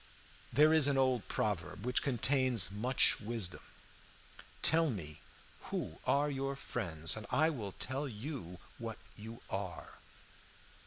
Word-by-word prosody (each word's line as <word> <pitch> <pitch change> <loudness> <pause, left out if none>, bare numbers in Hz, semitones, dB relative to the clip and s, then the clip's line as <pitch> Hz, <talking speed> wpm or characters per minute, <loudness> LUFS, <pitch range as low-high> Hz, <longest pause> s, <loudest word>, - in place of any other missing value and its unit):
"There 150 +5 +6
is 155 -3 +5
an 140 -1 +2
old 130 -4 +2
proverb 95 -1 -2
which 125 0 +2
contains 130 -6 +2
much 120 +6 +3
wisdom: 105 -5 -1 1.0
'Tell 165 0 +4
me 80 - -6 0.5
who - - -4
are 145 +1 +3
your 135 0 -2
friends, 80 - 0
and 110 -2 -6
I 155 +2 +3
will 105 -10 -5
tell 135 +3 -3
you 110 - -6 0.2
what 115 -2 -5 0.2
you 115 +2 -9
are.' 95 -2 -5
120 Hz, 125 wpm, -34 LUFS, 100-140 Hz, 1.0 s, There